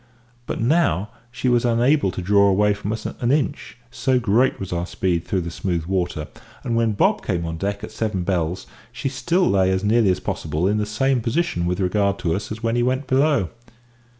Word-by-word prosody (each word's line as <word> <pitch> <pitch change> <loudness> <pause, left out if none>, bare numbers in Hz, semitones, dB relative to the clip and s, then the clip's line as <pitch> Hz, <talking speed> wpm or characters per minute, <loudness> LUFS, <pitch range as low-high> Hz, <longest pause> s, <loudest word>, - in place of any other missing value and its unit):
But - - -3
now 115 - +2 0.2
she 125 +1 -3
was 120 -1 +3
unable 120 +1 +3
to 90 0 -5
draw 100 +1 +4
away 105 +2 +3
from 100 0 -4
us 110 -1 -4
an 120 0 -2
inch, 145 -3 -1
so 130 +1 +1
great 120 +3 +2
was 95 -2 -5
our 85 0 -2
speed 90 -4 -1
through 95 - -1
the 85 0 -5
smooth 85 -2 -2
water; 90 -4 -2 0.4
and 115 - -1
when 115 -1 +2
Bob 100 - +2
came 85 -4 -1
on 80 0 -4
deck 100 +3 -3
at - - -6
"seven 105 -5 -2
bells," 90 -1 -1 0.3
she 135 - -3
still 165 +8 +1
lay 95 -1 +3
as 95 +1 0
nearly 110 0 +3
as 90 - +1
possible 80 +3 -2
in 105 +2 +1
the 105 - -1
same 130 +4 +1
position 115 - -1
with 90 +1 -1
regard 100 +1 +1
to 85 -4 -1
us 105 +5 -4
as 110 +2 -6
when 115 0 +1
he 120 - +2
went 130 +3 0
below. 135 - +2
105 Hz, 210 wpm, -22 LUFS, 90-120 Hz, 0.4 s, draw